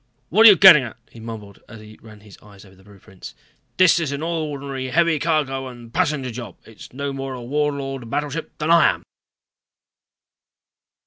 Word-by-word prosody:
"What 220 Hz, +6 st, +6 dB
are -, -, +11 dB
you 205 Hz, -, +7 dB
getting 180 Hz, -5 st, +8 dB
at?" 120 Hz, -4 st, -8 dB
he 115 Hz, -, -14 dB
mumbled 110 Hz, -3 st, -10 dB
as 110 Hz, -, -12 dB
he 110 Hz, 0 st, -15 dB
ran 110 Hz, -2 st, -16 dB
his 105 Hz, -1 st, -16 dB
eyes 100 Hz, -2 st, -17 dB
over 95 Hz, -1 st, -19 dB
the 95 Hz, -, -22 dB
blueprints. 95 Hz, -2 st, -14 dB, 0.4 s
"This 185 Hz, -2 st, +4 dB
is 160 Hz, -4 st, -3 dB
an 140 Hz, +2 st, -5 dB
ordinary 140 Hz, -5 st, -4 dB
heavy 165 Hz, +3 st, +1 dB
cargo 140 Hz, -4 st, -2 dB
and 120 Hz, -2 st, -13 dB
passenger 150 Hz, -8 st, -1 dB
job. 115 Hz, -5 st, -9 dB
It's 110 Hz, -, -14 dB
no 140 Hz, +2 st, -5 dB
more 135 Hz, -1 st, -6 dB
a 125 Hz, -, -9 dB
Warlord 135 Hz, -2 st, -3 dB
battleship 150 Hz, +4 st, -5 dB
than 155 Hz, +2 st, -2 dB
I 170 Hz, -1 st, +5 dB
am." -, -, -5 dB
135 Hz, 180 wpm, -20 LUFS, 115-155 Hz, 0.4 s, are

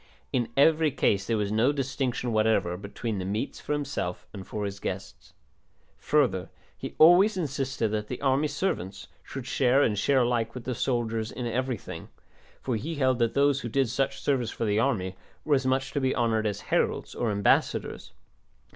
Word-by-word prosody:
In 120 Hz, -3 st, 0 dB
every 155 Hz, +2 st, +5 dB
case 100 Hz, -7 st, +1 dB
there 115 Hz, -, +1 dB
was 105 Hz, -1 st, -1 dB
no 115 Hz, +6 st, +3 dB
distinction 130 Hz, -3 st, -2 dB
whatever 110 Hz, -5 st, +2 dB
between 100 Hz, +2 st, -4 dB
the -, -, -3 dB
meats 105 Hz, +8 st, -3 dB
for -, -, -3 dB
himself 140 Hz, -11 st, -3 dB
and 95 Hz, -2 st, -8 dB
for 105 Hz, -1 st, -3 dB
his 100 Hz, 0 st, -5 dB
guests. 95 Hz, 0 st, -6 dB, 0.7 s
Further 125 Hz, -12 st, +1 dB, 0.3 s
he -, -, -7 dB
always 180 Hz, +6 st, +6 dB
insisted 135 Hz, -7 st, -1 dB
that 105 Hz, 0 st, -2 dB
the 125 Hz, -, -5 dB
army 140 Hz, +2 st, +2 dB
servants 100 Hz, -, -3 dB
should 135 Hz, -3 st, -7 dB
share 130 Hz, +1 st, +3 dB
and 105 Hz, -, +2 dB
share 135 Hz, +4 st, +3 dB
alike 120 Hz, -1 st, 0 dB
with 125 Hz, -, -6 dB
the 130 Hz, -, -2 dB
soldiers 115 Hz, -2 st, -1 dB
in 125 Hz, -, -5 dB
everything, 120 Hz, -8 st, -3 dB, 0.5 s
for 125 Hz, -, -1 dB
he 160 Hz, +9 st, -4 dB
held 130 Hz, -3 st, +2 dB
that 115 Hz, -1 st, +1 dB
those 140 Hz, -1 st, +3 dB
who 120 Hz, -, -4 dB
did 135 Hz, +1 st, +1 dB
such 135 Hz, +2 st, -1 dB
service 130 Hz, -5 st, 0 dB
for 115 Hz, -, -3 dB
the 105 Hz, 0 st, +1 dB
army 100 Hz, -7 st, 0 dB, 0.3 s
were 150 Hz, -, +2 dB
as 135 Hz, -2 st, +2 dB
much 135 Hz, +1 st, 0 dB
to 140 Hz, -, -1 dB
be 130 Hz, 0 st, +1 dB
honoured 110 Hz, -2 st, +1 dB
as 105 Hz, -, -3 dB
heralds -, -, 0 dB
or 120 Hz, -, -1 dB
ambassadors. 100 Hz, -1 st, +1 dB
120 Hz, 180 wpm, -27 LUFS, 105-135 Hz, 0.7 s, always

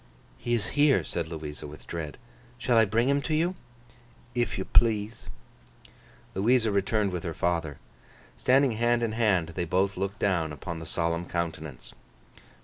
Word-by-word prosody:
'He 120 Hz, 0 st, 0 dB
is 110 Hz, -1 st, -1 dB
here,' 145 Hz, -2 st, +4 dB
said 85 Hz, -2 st, -3 dB
Louisa, 75 Hz, -2 st, -6 dB
with 75 Hz, +1 st, -12 dB
dread. 80 Hz, -3 st, -5 dB, 0.4 s
'Shall 120 Hz, 0 st, +1 dB
I 115 Hz, -1 st, +6 dB
bring 115 Hz, +4 st, +1 dB
him 140 Hz, +1 st, +3 dB
to 155 Hz, +2 st, -1 dB
you?' 170 Hz, +4 st, +1 dB, 0.8 s
'If 120 Hz, -1 st, 0 dB
yo 95 Hz, -, -3 dB
please.' 110 Hz, -, +2 dB, 1.0 s
Louisa 110 Hz, +3 st, +3 dB
returned 100 Hz, +1 st, +1 dB
with 90 Hz, -2 st, -3 dB
her 85 Hz, -3 st, -4 dB
father. 85 Hz, -5 st, -1 dB, 0.6 s
Standing 135 Hz, +1 st, +4 dB
hand 120 Hz, +1 st, +2 dB
in 115 Hz, -, 0 dB
hand, 105 Hz, -7 st, +2 dB
they 90 Hz, +1 st, -3 dB
both 95 Hz, +3 st, +1 dB
looked 100 Hz, +1 st, -2 dB
down 85 Hz, -7 st, +1 dB
upon 85 Hz, +2 st, -6 dB
the 80 Hz, -, -8 dB
solemn 85 Hz, +1 st, -1 dB
countenance. 80 Hz, -5 st, -4 dB
100 Hz, 155 wpm, -28 LUFS, 85-120 Hz, 1.0 s, I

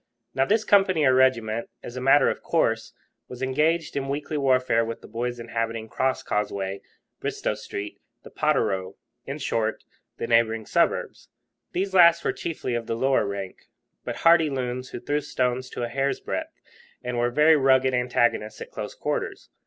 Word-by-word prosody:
Now 135 Hz, -, +2 dB
this 215 Hz, +5 st, +2 dB
company 195 Hz, -7 st, +4 dB
or 130 Hz, -, +5 dB
regiment, 115 Hz, -4 st, +2 dB
as 120 Hz, -, -8 dB
a 130 Hz, -, -4 dB
matter 135 Hz, +3 st, +5 dB
of -, -, -1 dB
course, 115 Hz, -9 st, 0 dB, 0.3 s
was 125 Hz, +1 st, -7 dB
engaged 155 Hz, +5 st, +1 dB
in 135 Hz, -1 st, -2 dB
weekly 145 Hz, +2 st, -3 dB
warfare 130 Hz, -4 st, +2 dB
with 115 Hz, 0 st, -5 dB
the -, -, -12 dB
boys 120 Hz, +2 st, -3 dB
inhabiting 115 Hz, -1 st, -3 dB
the 110 Hz, -, -21 dB
Crosscauseway, 105 Hz, -6 st, -1 dB, 0.4 s
Bristo -, -, -2 dB
Street, 100 Hz, +1 st, -7 dB, 0.2 s
the -, -, -13 dB
Potterrow 95 Hz, 0 st, 0 dB, 0.3 s
in 135 Hz, +2 st, -4 dB
short, 115 Hz, -6 st, -1 dB, 0.3 s
the -, -, -3 dB
neighbouring 115 Hz, -1 st, +2 dB
suburbs. -, -, 0 dB, 0.4 s
These 190 Hz, +2 st, -1 dB
last 170 Hz, -2 st, +6 dB
were -, -, +1 dB
chiefly 155 Hz, -6 st, -4 dB
of 120 Hz, -1 st, -3 dB
the 115 Hz, -, -1 dB
lower 130 Hz, -2 st, +2 dB
rank, 100 Hz, -2 st, -6 dB, 0.4 s
but -, -, -4 dB
hardy 165 Hz, -2 st, +6 dB
loons, 125 Hz, -1 st, -3 dB
who -, -, -6 dB
threw 145 Hz, +5 st, -1 dB
stones 130 Hz, -2 st, -1 dB
to 120 Hz, -, -5 dB
a -, -, -1 dB
hair's 135 Hz, +3 st, -1 dB
breadth -, -, -5 dB, 0.4 s
and 125 Hz, -1 st, -2 dB
were 120 Hz, 0 st, +2 dB
very 150 Hz, +5 st, +5 dB
rugged 130 Hz, -2 st, +3 dB
antagonists 120 Hz, -3 st, +1 dB
at -, -, -8 dB
close -, -, -6 dB
quarters. -, -, -3 dB
125 Hz, 170 wpm, -25 LUFS, 115-140 Hz, 0.4 s, last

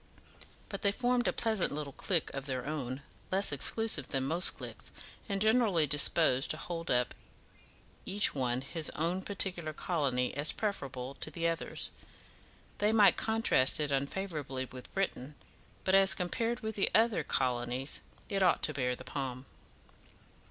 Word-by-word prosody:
But -, -, -6 dB
they 200 Hz, -, +3 dB
formed 245 Hz, +2 st, +1 dB
a -, -, +3 dB
pleasant 220 Hz, -5 st, 0 dB
little 145 Hz, -1 st, -5 dB
clique 170 Hz, +1 st, 0 dB
of 135 Hz, 0 st, -5 dB
their 130 Hz, -2 st, -3 dB
own, 140 Hz, -3 st, -4 dB, 0.3 s
less 195 Hz, -1 st, +2 dB
exclusive 150 Hz, -, +2 dB
than 135 Hz, -1 st, -1 dB
most 165 Hz, +7 st, +4 dB
cliques, -, -, -7 dB, 0.4 s
and 200 Hz, -1 st, -1 dB
generally 215 Hz, -6 st, +3 dB
disposed 145 Hz, -1 st, +4 dB
to 155 Hz, -, +2 dB
hold 165 Hz, 0 st, -5 dB
up 125 Hz, 0 st, +1 dB, 0.9 s
each 205 Hz, +2 st, +1 dB
one 125 Hz, -2 st, -1 dB
his 155 Hz, +4 st, -2 dB
own 170 Hz, +4 st, -1 dB
particular 180 Hz, -5 st, -2 dB
colony 140 Hz, -7 st, -1 dB
as 145 Hz, +2 st, +1 dB
preferable 135 Hz, -, -4 dB
to -, -, -1 dB
the 170 Hz, -1 st, -2 dB
others. 165 Hz, 0 st, -3 dB, 0.9 s
They 210 Hz, +1 st, +3 dB
might 210 Hz, -3 st, +6 dB
contrast 220 Hz, -13 st, +3 dB
it 150 Hz, -1 st, -1 dB
unfavourably 140 Hz, -2 st, -2 dB
with 130 Hz, 0 st, -12 dB
Britain, 150 Hz, -7 st, -3 dB, 0.5 s
but 190 Hz, -, 0 dB
as 195 Hz, 0 st, +6 dB
compared 225 Hz, +6 st, -2 dB
with 220 Hz, 0 st, -3 dB
the 200 Hz, -, +2 dB
other 225 Hz, -7 st, +3 dB
colonies, 125 Hz, 0 st, -1 dB, 0.3 s
it 195 Hz, -1 st, -1 dB
ought 180 Hz, -2 st, +3 dB
to 155 Hz, -, +2 dB
bear 125 Hz, -3 st, -1 dB
the 130 Hz, -, -11 dB
palm. 130 Hz, -1 st, -5 dB
155 Hz, 150 wpm, -32 LUFS, 135-195 Hz, 0.9 s, might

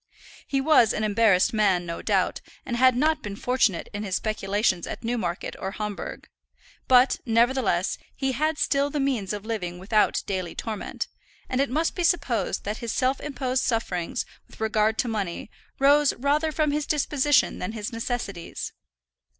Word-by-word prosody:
He 275 Hz, -, 0 dB
was 270 Hz, -6 st, +5 dB
an 215 Hz, -, -2 dB
embarrassed 210 Hz, -3 st, +3 dB
man, 195 Hz, -5 st, +2 dB
no 170 Hz, 0 st, -5 dB
doubt, -, -, 0 dB, 0.2 s
and 240 Hz, -, -2 dB
had 255 Hz, 0 st, +5 dB
not 305 Hz, +4 st, +2 dB
been 205 Hz, -4 st, -6 dB
fortunate 245 Hz, -5 st, +1 dB
in 205 Hz, -, -4 dB
his 195 Hz, -3 st, -2 dB
speculations 205 Hz, -3 st, 0 dB
at -, -, -6 dB
Newmarket 220 Hz, -7 st, -2 dB
or 190 Hz, +1 st, -4 dB
Homburg; 210 Hz, -1 st, -5 dB, 0.6 s
but, 255 Hz, +1 st, +5 dB
nevertheless, 230 Hz, -6 st, +2 dB, 0.2 s
he 270 Hz, -1 st, -1 dB
had 310 Hz, +4 st, 0 dB
still 280 Hz, 0 st, +1 dB
the 290 Hz, -, -2 dB
means 255 Hz, -9 st, 0 dB
of 210 Hz, 0 st, -5 dB
living 180 Hz, -6 st, -3 dB
without 210 Hz, +4 st, +1 dB
daily 185 Hz, -4 st, -3 dB
torment; 220 Hz, -3 st, -4 dB, 0.4 s
and 255 Hz, +1 st, 0 dB
it 275 Hz, -, 0 dB
must 315 Hz, +6 st, 0 dB
be 355 Hz, -, -2 dB
supposed 330 Hz, -9 st, +1 dB
that 210 Hz, +2 st, -3 dB
his 235 Hz, -2 st, -4 dB
self 260 Hz, 0 st, 0 dB
imposed 265 Hz, -3 st, -1 dB
sufferings, 190 Hz, -8 st, -1 dB, 0.2 s
with -, -, -17 dB
regard 220 Hz, 0 st, +1 dB
to -, -, 0 dB
money, 205 Hz, -3 st, -3 dB, 0.3 s
rose 285 Hz, +1 st, +5 dB
rather 295 Hz, +5 st, +1 dB
from 305 Hz, -1 st, +1 dB
his 295 Hz, 0 st, -1 dB
disposition 295 Hz, -1 st, +2 dB
than 185 Hz, +4 st, -4 dB
his 215 Hz, 0 st, -5 dB
necessities. 230 Hz, -6 st, -4 dB
230 Hz, 165 wpm, -25 LUFS, 205-275 Hz, 0.6 s, was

